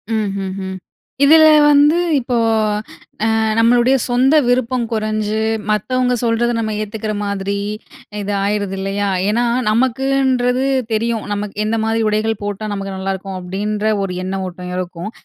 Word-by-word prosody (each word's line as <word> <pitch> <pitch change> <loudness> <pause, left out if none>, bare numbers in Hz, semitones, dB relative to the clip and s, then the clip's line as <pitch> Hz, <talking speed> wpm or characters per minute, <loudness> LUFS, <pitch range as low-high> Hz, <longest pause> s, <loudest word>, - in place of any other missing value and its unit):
ம்ஹ்ஹும். 195 -2 -3 0.5
இதில 315 +2 +7 0.2
வந்து 295 +2 +5 0.2
இப்போ, 245 -1 -2 1.0
அ - - +2 0.2
நம்மளுடைய 240 +3 +4
சொந்த 255 +4 +3
விருப்பம் 250 0 +1
குறைஞ்சு, 215 0 -1 0.3
மத்தவங்க 250 +4 +1
சொல்றத 235 +1 +1
நம்ம 220 -1 -2
ஏத்துக்கிற 215 0 -4
மாதிரி, 200 0 -2 0.6
இது 205 0 -3
ஆயிருது 200 -1 -1
இல்லையா? 195 +1 -2 0.2
ஏன்னா 235 +3 +1 0.3
நமக்குன்றது 260 +1 +1 0.3
தெரியும். 225 0 -1
நமக்கு 205 0 -4
"என்ன 225 +1 0
மாதிரி 225 0 0
உடைகள் 215 0 -1
போட்டா 205 +1 -4
நமக்கு 195 -1 -4
நல்லாருக்கும்!" 190 0 -4
அப்டின்ற 205 +4 -3 0.2
ஒரு 185 - -4
எண்ண 190 - -3
ஓட்டம் 180 0 -7
இருக்கும். 180 +2 -5
215 Hz, 125 wpm, -18 LUFS, 195-245 Hz, 1.0 s, இதில